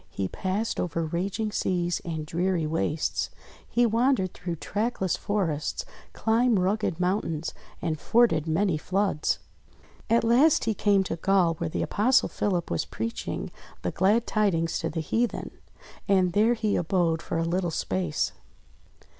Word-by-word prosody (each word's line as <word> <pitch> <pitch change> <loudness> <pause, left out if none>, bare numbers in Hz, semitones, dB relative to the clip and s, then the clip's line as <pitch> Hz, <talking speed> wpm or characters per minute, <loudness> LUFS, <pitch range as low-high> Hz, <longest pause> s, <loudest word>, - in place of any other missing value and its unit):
He 95 - -3
passed 195 - -2
over 165 -1 -1
raging 195 +7 -2
seas 175 -3 0
and 160 -3 -4
dreary 175 +1 0
wastes, 155 0 -1 0.4
he 240 0 +3
wandered 230 -4 +2
through 175 -1 -4
trackless 200 +1 -1
forests, 170 -8 -2 0.3
climbed 230 0 +2
rugged 185 -2 0
moun 185 +3 +2
tains, 160 0 -4 0.3
and 160 -3 -1
forded 205 -10 +3
many 165 0 +1
floods. 190 -3 0 0.7
At 230 0 +4
last 255 +7 +4
he 225 - +1
came 200 -1 +3
to 170 - -4
Gaul 185 -1 +3
where 170 - -1
the - - -2
Apostle 250 +6 +3
Philip 180 -5 -1
was 85 - 0
preaching 110 +8 -4 0.3
the - - -1
glad 210 +6 +2
tidings 175 -7 +1
to - - -2
the 160 +1 -3
heathen. 230 +9 -1 0.6
And 185 -3 +3
there 220 +4 +4
he 215 -2 0
abode 165 -1 +1
for - - -3
a 165 - 0
little 175 +1 0
space. 95 - -1
185 Hz, 145 wpm, -27 LUFS, 165-215 Hz, 0.7 s, At